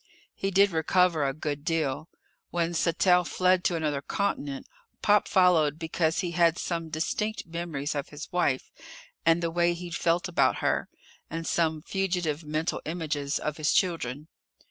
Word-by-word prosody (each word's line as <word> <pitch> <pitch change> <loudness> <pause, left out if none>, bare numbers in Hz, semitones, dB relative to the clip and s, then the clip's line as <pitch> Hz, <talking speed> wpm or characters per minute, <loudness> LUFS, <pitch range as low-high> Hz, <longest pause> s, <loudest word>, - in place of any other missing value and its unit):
He 195 - -2
did 195 +1 +4
recover 165 0 +2
a 135 - +1
good 145 0 -4
deal. 155 -1 -1 0.4
When 170 0 -1
Sattell 180 +2 +3
fled 185 +1 +2
to 175 - +2
another 150 -4 -1
continent, 145 -7 -2 0.4
Pop 205 -1 +4
followed 165 -6 +4
because 160 0 0
he 175 -2 -3
had 170 0 +3
some 165 -2 -3
distinct 210 +7 -2
memories 165 -4 -4
of 145 -2 -4
his 150 +1 -8
wife 170 -7 0 0.6
and 165 +1 +4
the 165 - 0
way 175 0 +2
he'd 175 0 -7
felt 170 +2 +1
about 180 - +2
her - - 0 0.4
and 165 +1 -4
some 160 -2 0
fugitive 175 -5 -1
mental 155 +2 -2
images 150 -3 -2
of 150 0 -3
his 155 -2 +1
children. 155 -5 0
165 Hz, 155 wpm, -27 LUFS, 155-175 Hz, 0.6 s, did